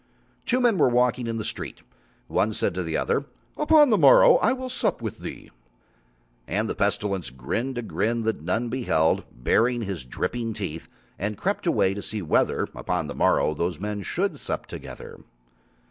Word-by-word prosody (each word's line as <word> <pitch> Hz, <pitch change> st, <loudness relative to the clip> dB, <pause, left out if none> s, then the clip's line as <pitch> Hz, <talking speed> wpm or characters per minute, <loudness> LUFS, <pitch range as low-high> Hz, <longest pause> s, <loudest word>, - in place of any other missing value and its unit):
Two 250 Hz, -, +2 dB
men 235 Hz, -7 st, +3 dB
were 140 Hz, -, +5 dB
walking 125 Hz, 0 st, +1 dB
in 115 Hz, 0 st, -2 dB
the 110 Hz, -, -4 dB
street; -, -, -5 dB, 0.4 s
one 110 Hz, -, +1 dB
said 100 Hz, -, 0 dB
to 90 Hz, -, -2 dB
the 80 Hz, -2 st, -2 dB
other: -, -, 0 dB, 0.3 s
"Upon 300 Hz, -3 st, +5 dB
the 215 Hz, -, +4 dB
morrow -, -, +7 dB
I -, -, +2 dB
will 260 Hz, 0 st, -3 dB
sup 255 Hz, -, -1 dB
with -, -, -5 dB
thee." -, -, -8 dB, 1.0 s
And 110 Hz, +4 st, 0 dB
the -, -, -2 dB
Pestilence 100 Hz, -3 st, -1 dB
grinned 115 Hz, -, -3 dB
a 120 Hz, -, -2 dB
grin 110 Hz, +6 st, -1 dB
that 110 Hz, 0 st, -1 dB
none 120 Hz, +2 st, -1 dB
beheld, 115 Hz, -11 st, +1 dB
baring 115 Hz, -, +1 dB
his 95 Hz, -8 st, -4 dB
dripping 115 Hz, -, -3 dB
teeth, 85 Hz, -6 st, -5 dB, 0.3 s
and 105 Hz, +1 st, -2 dB
crept -, -, -2 dB
away 95 Hz, -, +3 dB
to 100 Hz, -, -5 dB
see 105 Hz, -1 st, -4 dB
whether 80 Hz, -, +2 dB
upon 90 Hz, -3 st, -2 dB
the 70 Hz, -, -5 dB
morrow 75 Hz, -, +2 dB
those 85 Hz, +1 st, -2 dB
men 105 Hz, +1 st, -3 dB
should 95 Hz, -, -2 dB
sup -, -, -4 dB
together. -, -, -9 dB
110 Hz, 175 wpm, -25 LUFS, 90-125 Hz, 1.0 s, morrow